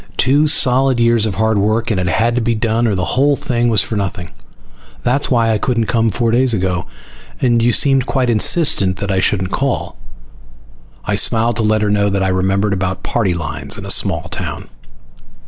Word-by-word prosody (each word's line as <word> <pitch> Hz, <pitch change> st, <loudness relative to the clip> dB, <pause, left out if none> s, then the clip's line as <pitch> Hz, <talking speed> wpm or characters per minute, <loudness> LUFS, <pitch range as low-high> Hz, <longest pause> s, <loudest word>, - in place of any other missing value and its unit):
Two 145 Hz, +4 st, +2 dB
solid 130 Hz, -3 st, +3 dB
years 115 Hz, -2 st, +2 dB
of 100 Hz, -, -4 dB
hard 110 Hz, +1 st, 0 dB
work 110 Hz, +3 st, 0 dB
and 100 Hz, -, -1 dB
it 90 Hz, -, -2 dB
had 115 Hz, +6 st, 0 dB
to 125 Hz, -, -1 dB
be 115 Hz, 0 st, -1 dB
done 115 Hz, +2 st, 0 dB
or 105 Hz, -, 0 dB
the 90 Hz, -1 st, -2 dB
whole 140 Hz, +9 st, +1 dB
thing 120 Hz, -2 st, -1 dB
was 110 Hz, -5 st, +2 dB
for 110 Hz, -, -5 dB
nothing. 90 Hz, -4 st, -4 dB, 0.7 s
That's 125 Hz, +4 st, 0 dB
why 115 Hz, -3 st, +1 dB
I 110 Hz, -, 0 dB
couldn't 115 Hz, -2 st, -1 dB
come 115 Hz, 0 st, 0 dB
four 115 Hz, +3 st, -1 dB
days 125 Hz, 0 st, +2 dB
ago. 90 Hz, -3 st, -2 dB, 0.5 s
And 120 Hz, -3 st, +1 dB
you 120 Hz, +1 st, +2 dB
seemed 135 Hz, 0 st, +2 dB
quite 130 Hz, -2 st, 0 dB
insistent 110 Hz, -, +2 dB
that 100 Hz, 0 st, -4 dB
I 95 Hz, -, 0 dB
shouldn't 95 Hz, 0 st, 0 dB
call." 135 Hz, +3 st, -3 dB, 1.1 s
I 105 Hz, -, -1 dB
smiled 115 Hz, +2 st, +1 dB
to -, -, +1 dB
let 110 Hz, 0 st, +1 dB
her 105 Hz, -, 0 dB
know 100 Hz, 0 st, +1 dB
that 100 Hz, -1 st, -1 dB
I 95 Hz, -, 0 dB
remembered 95 Hz, +2 st, 0 dB
about 95 Hz, -1 st, -3 dB
party 95 Hz, -7 st, -1 dB
lines 80 Hz, -5 st, -4 dB
in -, -, -8 dB
a -, -, 0 dB
small -, -, +1 dB
town. -, -, -5 dB
110 Hz, 200 wpm, -16 LUFS, 100-120 Hz, 1.1 s, solid